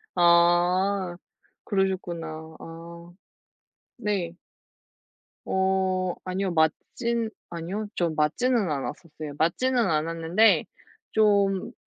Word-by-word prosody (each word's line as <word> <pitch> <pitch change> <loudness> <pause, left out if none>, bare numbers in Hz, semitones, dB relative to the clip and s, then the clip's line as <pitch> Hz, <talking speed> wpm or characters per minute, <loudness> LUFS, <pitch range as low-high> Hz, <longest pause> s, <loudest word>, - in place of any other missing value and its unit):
아 175 +2 +3 0.5
그러셨구나. 190 -4 -1 0.3
아. 170 +1 -11 0.9
네. 200 -7 -1 1.1
어, 190 -1 +1
아니요. 185 0 -2
맞진 225 +9 0 0.2
아니요. 175 +6 -4
저 175 -2 +1
맞지는 200 - +1
않았었어요. 150 +1 -5
맞지는 250 +11 +1
않았는데 165 +7 +3 0.5
좀 200 -3 +2
180 Hz, 170 characters per minute, -26 LUFS, 165-200 Hz, 1.1 s, 아